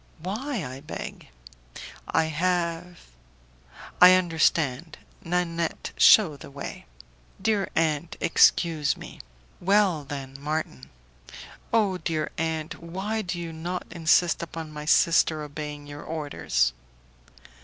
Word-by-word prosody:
"Why, 220 - -3
I 130 +1 -7
beg?" 145 - -8 0.8
"I 160 - +2
have 170 +1 -1 0.5
." - - -18
"I 180 +1 +10
understand. 160 -4 +1 0.3
Nanette, 170 -1 -2
shew 170 -10 +6
the - - -11
way." 140 - -8 0.5
"Dear 210 -3 0
aunt, 160 0 0
excuse 165 -2 +3
me." - - -10 0.4
"Well, 190 -4 +2
then, 135 -1 -7
Marton." 145 - -4 0.8
"Oh! 205 -5 +2
dear 155 -3 -2
aunt, 160 +1 -3
why 190 +6 -3
do 180 -3 -4
you 165 -1 -6
not 175 +3 -4
insist 170 0 +2
upon 165 -1 -7
my 150 0 -7
sister 155 0 +3
obeying 150 0 -7
your 145 0 -9
orders?" 145 - -1
165 Hz, 110 wpm, -26 LUFS, 150-180 Hz, 0.8 s, I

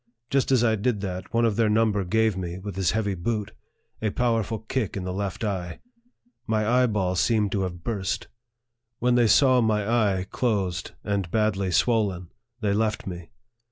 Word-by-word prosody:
Just 135 -1 +2
as 125 -3 +4
I 110 -2 +3
did 105 0 -1
that, 95 -1 -5
one 115 0 +2
of 110 -3 +1
their 115 -2 +3
num 110 +1 +3
ber 100 -1 -1
gave 110 +2 +1
me, 90 -2 -4
with 95 0 -7
his 95 -2 +1
heavy 105 -2 0
boot, 105 +3 -2 0.5
a 110 - +1
powerful 115 -1 0
kick 110 -1 -3
in 95 - -4
the 90 0 -3
left 100 +2 -3
eye. 90 -5 -3 0.7
My 110 -1 +1
eyeball 110 -7 +2
seemed 105 0 +2
to 100 - 0
have 90 -2 -4
burst. 100 -5 -2 0.7
When 125 +1 +2
they 120 -1 +4
saw 130 +2 +5
my 105 -2 +1
eye 105 -5 +1
closed, 95 -7 -1
and 100 -4 -1
badly 100 -1 +1
swollen, 95 -3 +1 0.3
they 105 -2 +1
left 110 +1 0
me. 90 -3 -7
105 Hz, 180 wpm, -25 LUFS, 95-115 Hz, 0.7 s, saw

